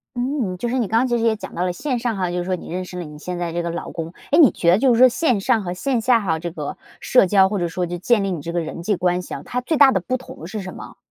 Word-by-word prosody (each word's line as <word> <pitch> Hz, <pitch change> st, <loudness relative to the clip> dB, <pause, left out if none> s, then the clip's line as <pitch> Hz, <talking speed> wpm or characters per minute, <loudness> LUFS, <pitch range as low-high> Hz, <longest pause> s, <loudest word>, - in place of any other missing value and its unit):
嗯， 245 Hz, -7 st, -2 dB
就 240 Hz, -, -3 dB
是 255 Hz, +2 st, -1 dB
你 230 Hz, -, 0 dB
刚 225 Hz, +3 st, +2 dB
刚 260 Hz, -, +2 dB
其 240 Hz, -1 st, +1 dB
实 230 Hz, -, -2 dB
也 225 Hz, -1 st, +3 dB
讲 215 Hz, -, -9 dB
到 175 Hz, -, -2 dB
了 180 Hz, -, 0 dB
线 250 Hz, +6 st, -2 dB
上 230 Hz, -3 st, -2 dB
哈， 180 Hz, -2 st, -1 dB
就 180 Hz, -, -3 dB
是 175 Hz, -, -1 dB
说 185 Hz, +1 st, -1 dB
你 175 Hz, -, -10 dB
认 185 Hz, +1 st, -3 dB
识 180 Hz, -, -9 dB
了 180 Hz, -, -4 dB
你 150 Hz, 0 st, -10 dB
现 180 Hz, +2 st, -5 dB
在 175 Hz, -1 st, -3 dB
这 175 Hz, -, -1 dB
个 170 Hz, -, -3 dB
老 170 Hz, +1 st, -5 dB
公， 165 Hz, 0 st, -6 dB, 0.2 s
诶 300 Hz, -, +5 dB
你 295 Hz, -7 st, +8 dB
觉 170 Hz, 0 st, +2 dB
得 185 Hz, -, +5 dB
就 255 Hz, -1 st, +4 dB
是 -, -, +2 dB
说 255 Hz, +2 st, +8 dB
线 255 Hz, -2 st, +1 dB
上 210 Hz, +2 st, +1 dB
和 175 Hz, -1 st, -3 dB
线 245 Hz, +6 st, -1 dB
下 240 Hz, 0 st, +4 dB
哈， 165 Hz, -7 st, -1 dB
这 170 Hz, +1 st, -4 dB
个 170 Hz, -, -6 dB, 0.2 s
社 250 Hz, -7 st, +4 dB
交 190 Hz, 0 st, +5 dB
或 205 Hz, -2 st, -2 dB
者 175 Hz, -, 0 dB
说 180 Hz, +2 st, -2 dB
就 175 Hz, +1 st, -5 dB
建 210 Hz, +4 st, +2 dB
立 195 Hz, -, -1 dB
你 170 Hz, -, -4 dB
这 165 Hz, -, -5 dB
个 175 Hz, -, -1 dB
人 165 Hz, +1 st, -5 dB
际 205 Hz, +4 st, 0 dB
关 180 Hz, 0 st, 0 dB
系 -, -, -9 dB
啊， -, -, -7 dB
它 250 Hz, -, -3 dB
最 300 Hz, +4 st, -1 dB
大 280 Hz, -2 st, +7 dB
的 190 Hz, -, +1 dB
不 255 Hz, +8 st, -2 dB
同 205 Hz, -10 st, -11 dB
是 210 Hz, +3 st, -5 dB
什 185 Hz, -1 st, -7 dB
么？ -, -, -11 dB
190 Hz, 375 characters per minute, -21 LUFS, 175-240 Hz, 0.2 s, 你